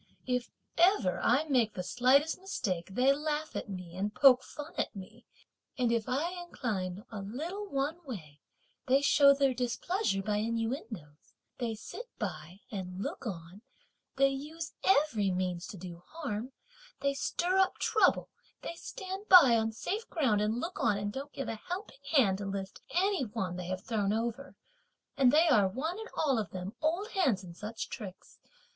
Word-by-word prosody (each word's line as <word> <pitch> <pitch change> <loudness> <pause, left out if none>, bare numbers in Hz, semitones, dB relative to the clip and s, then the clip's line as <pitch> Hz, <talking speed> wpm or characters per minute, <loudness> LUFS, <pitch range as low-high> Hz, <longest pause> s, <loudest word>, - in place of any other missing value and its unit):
If 250 -1 -1 0.3
ever 335 - +4
I 255 +6 +4
make 250 -8 +1
the 180 - -3
slightest 265 - +3
mistake, 195 - -3
they 265 +2 +5
laugh 300 +1 -2
at - - -4
me 180 -3 -7
and 200 +3 -1
poke 255 +2 +7
fun 295 +3 -9
at - - -2
me; 220 +5 -11 0.5
and 245 -2 +2
if 230 -2 0
I 295 +7 0
incline 205 - -4
a 215 - -5
little 325 - -5
one 290 +5 -2
way, 165 - -8 0.5
they 270 +2 +4
show 280 0 +7
their 275 -1 +3
displeasure 250 - -1
by 210 +1 0
innuendoes; 225 - -4 0.2
they 235 -3 -1
sit 475 - -8
by 180 +6 -5
and 185 -3 -5
look - - -5
on, 175 0 -7 0.5
they 275 0 +5
use 300 +3 -6
every 285 - +3
means 180 -1 -2
to 200 - -8
do 175 -1 -9
harm, 255 -7 -4 0.5
they 280 0 +1
stir 350 +6 0
up 380 -1 +3
trouble, 435 - +2 0.3
they - - -4
stand 380 +2 -7
by 285 -11 +9
on 225 0 +1
safe 410 - -4
ground 255 -11 +2
and 215 +3 0
look 340 +7 -4
on 210 -3 +3
and 205 0 -3
don't 280 +2 -6
give 270 - -5
a 220 - -5
helping 360 -6 -5
hand 200 -10 +4
to 200 - -4
lift 195 -1 -5
any 380 -3 +2
one 205 -6 -3
they 180 -1 -5
have 185 0 -3
thrown 210 -4 0
over, 235 +5 -3 0.6
and 265 -3 +5
they 320 +4 +5
are, 215 -10 +5
one 315 - -3
and 445 - -7
all 275 -6 +2
of 210 -5 -3
them, 185 +3 -6
old 345 +8 0
hands 270 - +1
in 175 -2 -9
such 210 +5 -5
tricks. 195 -6 -9
245 Hz, 175 wpm, -31 LUFS, 200-300 Hz, 0.6 s, by